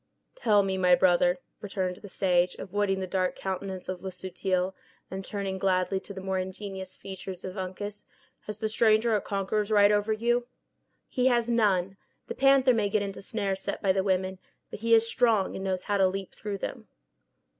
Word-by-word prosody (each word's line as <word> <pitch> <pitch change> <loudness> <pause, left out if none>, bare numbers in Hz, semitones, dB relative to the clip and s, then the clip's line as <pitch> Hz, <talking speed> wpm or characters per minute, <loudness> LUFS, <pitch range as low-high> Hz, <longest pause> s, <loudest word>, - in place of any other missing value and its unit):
"Tell 210 - +3
me, 195 -1 -1
son 190 - -2
of - - -2
my 180 -1 +6
brother," 175 0 +3 0.2
returned 190 -3 -2
the 205 0 -11
sage, 180 -2 +2
avoiding 195 0 -1
the - - -1
dark 185 0 0
countenance 190 -1 -4
of 185 -1 -4
Le 190 - -4
Subtil, 185 0 -2 0.4
and 190 +1 -4
turning 195 -1 -4
gladly 185 0 +1
to 200 - -11
the 190 -1 -7
more 190 0 -1
ingenuous 190 0 -6
features 190 -1 -7
of 185 0 -6
Uncas, 200 +2 -5 0.4
"has 210 -1 -5
the 220 0 -1
stranger 220 +1 +3
a 205 - +1
conqueror's 200 +1 -1
right 205 -1 +6
over 210 +1 +2
you?" 240 +2 +1 0.6
"He 255 0 +1
has 240 -2 +2
none. 195 -5 +2 0.3
The - - -5
panther 270 -1 +5
may 210 -3 +1
get 205 0 +1
into 195 -1 -5
snares 195 -2 -2
set - - -3
by 195 - +4
the 190 0 +2
women; 190 -1 0 0.3
but - - -7
he 230 +1 +4
is 225 0 +4
strong, 225 -5 +2
and 190 - -5
knows 185 -1 -1
how 205 -1 0
to 190 - +5
leap 195 0 -4
through 205 -2 -5
them." - - -6
195 Hz, 200 wpm, -28 LUFS, 185-210 Hz, 0.6 s, my